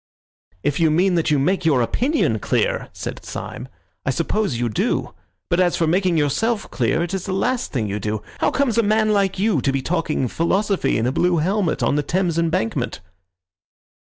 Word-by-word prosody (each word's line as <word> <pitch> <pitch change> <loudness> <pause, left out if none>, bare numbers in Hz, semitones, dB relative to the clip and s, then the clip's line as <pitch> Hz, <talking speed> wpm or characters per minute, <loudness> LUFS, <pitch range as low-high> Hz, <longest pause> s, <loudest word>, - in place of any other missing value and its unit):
"If 145 +1 0
you 165 -1 +4
mean 180 +5 +3
that 170 -2 +1
you 150 - +3
make 185 +7 +1
your 140 -7 +3
opinion 270 - +1
clear," - - 0
said - - -7
Syme, - - -7 0.4
"I - - -2
suppose 205 - 0
you 120 0 0
do. 105 - -1 0.3
But 175 - +1
as 180 -1 +3
for 165 - +1
making 180 +1 +2
yourself 205 - 0
clear, 130 +7 +1
it 175 +2 -4
is 190 -2 -3
the 190 - -1
last 245 +6 -1
thing 115 -6 -1
you 100 +1 -3
do. 105 +1 -3 0.2
How - - +3
comes 255 -5 +1
a - - +6
man 215 0 +2
like 195 -2 +1
you 195 - +1
to 135 - +1
be 135 -1 -2
talking 160 -5 0
philosophy 195 - 0
in 110 - 0
a 125 - +1
blue 175 +4 +2
helmet 185 +2 0
on 145 - +2
the - - +2
Thames 175 +1 0
embankment?" 165 - -1
175 Hz, 195 wpm, -21 LUFS, 145-200 Hz, 0.4 s, a